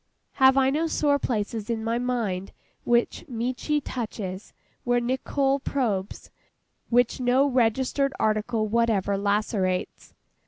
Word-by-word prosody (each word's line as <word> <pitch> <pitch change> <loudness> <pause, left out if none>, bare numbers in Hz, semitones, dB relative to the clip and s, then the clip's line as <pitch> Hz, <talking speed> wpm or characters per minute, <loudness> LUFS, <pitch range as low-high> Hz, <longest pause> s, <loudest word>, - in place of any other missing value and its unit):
Have 265 0 +7
I 265 0 +4
no 315 +4 0
sore 290 -2 +1
places 220 -2 -3
in 225 -1 -2
my 230 +1 0
mind 225 -7 -2 0.3
which 240 0 +1
MECHI 255 +4 -2
touches—which 230 +1 -4
NICOLL 270 +2 0
probes—which 240 0 -2
no 255 +2 +3
registered 260 +2 +1
article 215 +1 0
whatever 215 -3 +1
lacerates? 200 -2 -1
235 Hz, 105 wpm, -25 LUFS, 215-265 Hz, 0.3 s, Have